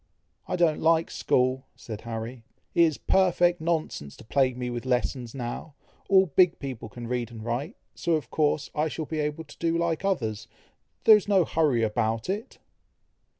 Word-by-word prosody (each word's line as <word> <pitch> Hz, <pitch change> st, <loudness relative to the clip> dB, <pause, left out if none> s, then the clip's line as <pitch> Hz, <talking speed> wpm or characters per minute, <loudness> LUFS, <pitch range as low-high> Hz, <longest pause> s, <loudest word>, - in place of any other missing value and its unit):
"I -, -, -1 dB
don't 170 Hz, -4 st, +2 dB
like 165 Hz, 0 st, +3 dB
school!" 130 Hz, +1 st, +1 dB
said 110 Hz, -2 st, -8 dB
Harry. 115 Hz, +1 st, -6 dB, 0.3 s
"It -, -, +4 dB
is 155 Hz, -3 st, 0 dB
perfect 175 Hz, -2 st, +2 dB
nonsense 160 Hz, -, -2 dB
to -, -, -13 dB
plague 130 Hz, +2 st, +1 dB
me 125 Hz, -1 st, -3 dB
with 120 Hz, -1 st, -4 dB
lessons 125 Hz, -1 st, -1 dB
now. 130 Hz, +4 st, -5 dB, 0.3 s
All 190 Hz, -1 st, +6 dB
big 180 Hz, +1 st, +3 dB
people 130 Hz, -5 st, -6 dB
can 120 Hz, +2 st, -8 dB
read 120 Hz, -1 st, -2 dB
and 115 Hz, -2 st, -9 dB
write, 130 Hz, -, -3 dB, 0.2 s
so, 170 Hz, -, -1 dB
of 150 Hz, -6 st, -1 dB
course, 150 Hz, -1 st, +1 dB
I 155 Hz, +1 st, +1 dB
shall 160 Hz, 0 st, -4 dB
be 155 Hz, +1 st, -4 dB
able 150 Hz, +2 st, -2 dB
to 145 Hz, -, -15 dB
do 165 Hz, 0 st, +1 dB
like 170 Hz, 0 st, -1 dB
others. 110 Hz, -, -1 dB, 0.6 s
There 220 Hz, -1 st, +9 dB
is 205 Hz, -, -5 dB
no 195 Hz, -4 st, +4 dB
hurry 145 Hz, -9 st, +2 dB
about 110 Hz, -, 0 dB
it!" 210 Hz, +3 st, -5 dB
145 Hz, 180 wpm, -27 LUFS, 120-165 Hz, 0.6 s, There